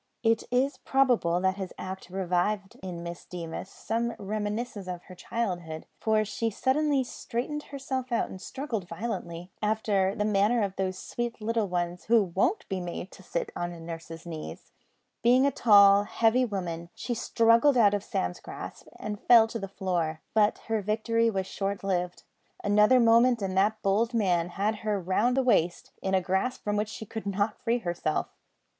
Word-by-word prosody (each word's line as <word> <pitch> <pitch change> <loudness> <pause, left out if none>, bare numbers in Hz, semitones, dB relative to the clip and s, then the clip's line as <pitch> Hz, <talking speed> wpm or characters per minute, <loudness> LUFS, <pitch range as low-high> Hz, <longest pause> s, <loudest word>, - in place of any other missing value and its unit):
It 225 -1 +2
is 260 +3 +1
probable 245 -11 +2
that 190 +1 +1
this 190 -2 -5
act 190 -1 -7
revived 190 +2 -1
in 175 -2 -6
Miss 170 0 -7
Deemas 170 +1 -6
some 230 +2 -2
reminiscences 210 0 -3
of 180 -1 -5
her 185 - -12
childhood, 175 -6 -4
for 215 -1 +2
she 225 +2 -1
suddenly 275 +5 +1
straightened 255 +4 -4
herself 265 -2 -4
out 235 - +1
and 190 - -9
struggled 230 -7 -4
violently, 180 -3 -5
after 210 -3 +1
the 210 - 0
manner 210 +3 +3
of 195 -1 -2
those 185 -1 -2
sweet 240 +3 -4
little 225 -1 0
ones 175 -1 -2
who 225 -1 +5
won't 200 - 0
be 190 -2 -3
made 175 +1 -6
to - - -14
sit 175 -2 -3
on 175 -1 -5
nurse's 165 0 -8
knees. 160 -2 -8 0.5
Being 250 +3 +5
a 280 - +3
tall, 200 -4 +6
heavy 230 +4 +3
woman, 170 -6 -4
she 245 - -3
struggled 230 +4 +4
out 205 -4 +5
of 205 -1 -1
Sam's 90 - -2
grasp - - -9
and 210 -1 -5
fell 235 -2 +7
to 230 - -4
the 195 - -4
floor; 175 -5 -2
but 215 -1 +3
her 225 -1 0
victory 230 +3 +1
was 190 -3 -1
short 200 +1 -3
lived. 180 -2 -2 0.4
Another 210 +5 +5
moment 235 +1 +5
and 190 -1 -2
that 210 +3 +2
bold 220 +4 +2
man 175 -6 +2
had 205 +4 -1
her 210 -1 -1
round 205 +8 +1
the 265 - +3
waist, 175 -9 +1
in 190 0 0
a 190 - +3
grasp 190 +8 -1
from 205 0 -1
which 210 0 0
she 220 - -7
could 220 0 -6
not 205 +2 -1
free 235 0 +1
herself. 175 -7 -2
205 Hz, 175 wpm, -28 LUFS, 185-230 Hz, 0.5 s, fell